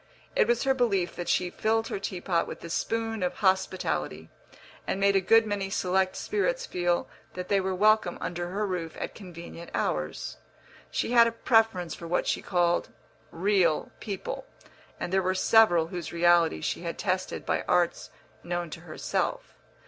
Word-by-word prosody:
It - - +4
was 240 0 +2
her 270 -1 +3
belief 200 -9 +1
that 175 - -4
she 180 -1 +1
filled 225 +1 0
her - - -3
tea 185 -2 -4
pot 170 -3 0
with - - -8
the 170 - -7
spoon 225 +3 -1
of 180 - -1
hospitality, 185 - 0 0.6
and 190 - -1
made 200 0 +3
a 195 - +4
good 225 +4 +5
many 205 -2 -2
select 190 0 +1
spirits 485 +4 -1
feel 175 - 0 0.3
that 180 0 -5
they 200 -1 +3
were 190 0 -1
welcome 215 -2 +3
under 175 0 -4
her 205 +3 -1
roof 175 -4 -4
at - - -4
convenient 170 -3 -10
hours. 75 0 -2 0.5
She - - -2
had 235 -1 +7
a - - 0
preference 225 -7 +2
for 170 - -8
what 175 - 0
she - - 0
called 175 -1 +1 0.4
real 180 -2 +1
people, 200 -3 -5 0.5
and 175 - -4
there 190 - +4
were 185 0 0
several 185 -5 +5
whose 175 -2 -5
reality 170 - +3
she - - -2
had - - -4
tested - - -2
by - - 0
arts 175 -1 +1 0.3
known 175 -1 -3
to - - -7
herself. 175 - -3
185 Hz, 170 wpm, -28 LUFS, 175-215 Hz, 0.6 s, had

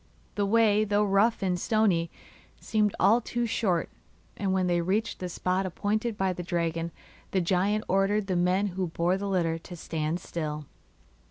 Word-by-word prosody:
The 205 -1 0
way, 215 -1 +4
though 210 0 +2
rough 205 +2 +2
and 180 -2 0
stony, 190 -6 +2 0.5
seemed 210 -2 0
all 220 +6 +5
too 240 0 -2
short, 200 -6 0 0.5
and 195 -2 -1
when 190 -1 +1
they 175 -1 +1
reached 205 +6 -1
the 180 - -4
spot 185 +2 -1
appointed 215 +4 -1
by 190 -1 +1
the 180 - -6
dragon 170 -1 -1 0.4
the 190 - +1
giant 190 +4 +1
ordered 195 +2 +2
the 190 -2 -1
men 180 +3 +2
who 185 0 -2
bore 170 +2 0
the 200 +1 -3
litter 165 -4 0
to 175 +2 -10
stand 160 0 -3
still. 150 -4 -4
190 Hz, 170 wpm, -28 LUFS, 175-210 Hz, 0.5 s, all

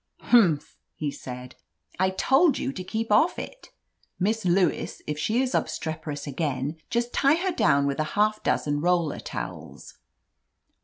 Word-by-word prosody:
"Humph 165 -10 +3
!" - - -54
he 150 -2 -2
said. 125 -1 -8 0.5
"I 190 0 +3
told 270 - +3
you 270 - -2
to 185 - -6
keep 220 +4 -3
off 325 +11 +4
it! - - -8 0.5
Miss 220 +3 0
Lewis, 180 +1 +1
if 150 0 -3
she 225 +10 +1
is 255 - -2
obstreperous 155 -3 -3
again, 145 0 -2
just 235 0 -1
tie 280 +2 +4
her 370 +3 -1
down 140 - +3
with 140 0 -1
a - - +3
half 215 +1 +2
dozen 145 0 0
roller 170 -2 +1
towels." - - -8
180 Hz, 155 wpm, -26 LUFS, 145-235 Hz, 0.5 s, off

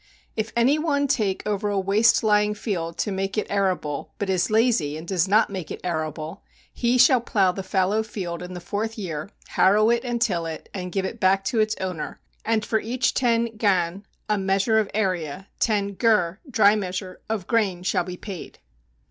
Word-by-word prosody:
If 220 0 -2
any 260 +6 +3
one 290 -3 +1
take 210 -8 0
over 210 0 -1
a 200 -1 0
waste 205 +6 +3
lying 210 -1 +3
field 170 -6 -3
to 210 - -1
make 195 +2 -2
it 215 - +1
arable, 185 -8 -1
but 200 -2 -1
is 180 -2 +1
lazy, 215 -10 +2
and 160 +2 -9
does 185 -1 +1
not 210 +2 +3
make 185 -5 -5
it - - -6
arable, 155 +1 -4 0.3
he 240 +1 +1
shall 255 0 +6
plow 195 -6 +2
the 195 - -5
fallow 190 +3 +1
field 185 -6 -5
in 180 0 -7
the - - -5
fourth 210 +6 -3
year, 165 -4 -4 0.2
harrow 210 +4 +4
it 235 0 +1
and 240 -2 -2
till 180 -8 0
it, 160 - -7
and 180 -2 -5
give 190 0 -1
it 220 +4 -5
back 195 -1 +3
to 230 +2 0
its 215 0 +2
owner 185 -4 -4 0.2
and 220 -1 0
for 220 - +1
each 245 +3 0
ten 235 -2 +1
gan 190 -3 +1 0.2
[a 210 -1 +1
measure 195 +3 +2
of 210 -2 -1
area] 185 -4 -1
ten 205 -3 +1
gur 200 -4 +2
[dry 215 -4 +5
measure] 185 -2 -4
of 215 -5 -2
grain 195 -6 0
shall 180 - +1
be 180 0 -7
paid. 190 -4 -8
200 Hz, 195 wpm, -24 LUFS, 180-220 Hz, 0.3 s, shall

